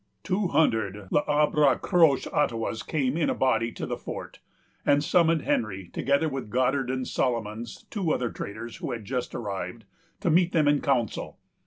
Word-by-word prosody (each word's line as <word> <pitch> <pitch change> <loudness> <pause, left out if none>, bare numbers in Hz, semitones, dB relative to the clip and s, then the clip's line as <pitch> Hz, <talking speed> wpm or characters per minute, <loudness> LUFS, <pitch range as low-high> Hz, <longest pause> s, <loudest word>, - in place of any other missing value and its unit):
Two 190 +1 0
hundred 105 - +1
L'Arbre 150 -1 +3
Croche 165 -7 +4
Ottawas 115 -5 0
came 140 -4 -1
in 165 - +1
a - - 0
body 115 -3 +1
to - - -5
the - - -4
fort, - - -7 0.4
and 145 0 +3
summoned 165 -1 +3
Henry, 95 -5 -1
together 140 +4 +1
with 135 -6 -4
Goddard 130 +2 +1
and 130 -1 -2
Solomons, 115 -2 -2
two 190 -7 -1
other 120 -5 0
traders, 110 +3 -7
who - - -4
had 115 -3 -6
just 125 +2 -3
arrived, 100 -1 -5 0.4
to 170 - +2
meet 175 +2 +3
them 155 -3 +3
in 145 0 +3
council. 125 -6 -1
130 Hz, 165 wpm, -27 LUFS, 115-150 Hz, 0.4 s, Croche